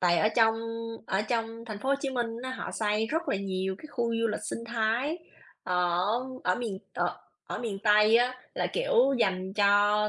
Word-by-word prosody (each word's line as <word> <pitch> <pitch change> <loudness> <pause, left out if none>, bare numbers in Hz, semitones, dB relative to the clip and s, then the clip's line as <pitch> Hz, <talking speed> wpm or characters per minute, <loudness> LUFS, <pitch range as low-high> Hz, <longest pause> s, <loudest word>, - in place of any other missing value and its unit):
tại 175 -2 +4
ở 215 - +4
trong 225 -1 +5 0.5
ở 190 +2 +1
trong 225 0 -2
thành 215 -3 -6
phố 265 - -4
Hồ 275 - +5
Chí 275 -2 -2
Minh 240 -2 0 0.2
á, 260 - -4
họ 260 - -5
xây 215 0 0
rất 325 +6 -2
là - - +1
nhiều 190 -1 -2
cái - - -15
khu 240 -3 -1 0.2
du 230 - +3
lịch 210 - -2
sinh - - -3
thái 235 +8 0 0.4
ở 180 -1 +1 0.4
ở 180 - +3
miền 220 -6 -4 0.2
ở - - -1 0.3
ở - - -4
miền 215 -5 -3
Tây 210 +1 +5
á, 250 +1 +2 0.2
là, - - 0
kiểu, 485 - +3
dành 190 -2 0
cho 205 +1 +4
220 Hz, 200 wpm, -29 LUFS, 200-240 Hz, 0.5 s, trong